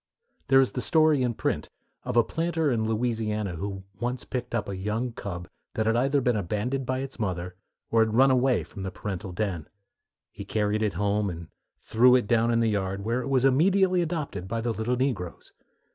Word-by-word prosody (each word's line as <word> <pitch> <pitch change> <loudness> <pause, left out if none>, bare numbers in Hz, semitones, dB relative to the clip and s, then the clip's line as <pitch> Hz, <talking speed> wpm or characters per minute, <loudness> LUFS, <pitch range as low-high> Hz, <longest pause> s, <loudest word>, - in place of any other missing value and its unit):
There 135 -1 +6
is 135 - +2
a 125 - -1
story 155 0 +3
in 120 -2 0
print - - -2 0.4
of - - -1
a 120 - +7
planter 165 +2 0
in 110 -2 0
Louisiana 110 -4 -1
who 95 +1 -5 0.2
once 120 +2 -3
picked 120 -2 -4
up 105 -3 -1
a 100 - -4
young 105 +6 -2
cub 90 -6 -6 0.3
that 110 - 0
had 115 +1 +2
either 135 +3 +2
been 125 -2 +2
abandoned 110 +7 -2
by 130 0 -1
its 135 -2 -7
mother, 90 -3 -3 0.4
or 115 - +4
had 110 0 -2
run 135 +2 +6
away 130 -1 +2
from 100 - -10
the 95 - -3
parental 95 0 -5
den. 90 -4 -3 0.6
He - - -8
carried 105 0 0
it 105 -3 0
home 100 +2 0
and 85 -2 -7 0.3
threw 125 +3 +5
it 125 - +2
down 115 +1 +2
in 115 0 +2
the 115 - +2
yard, 100 -1 -2
where 120 +3 0
it 130 - -5
was 135 -1 +3
immediately 180 +7 +4
adopted 155 - -3
by 115 +3 -2
the 115 +1 -1
little 110 +3 -1
negroes. 120 -10 -3
115 Hz, 205 wpm, -27 LUFS, 100-130 Hz, 0.6 s, a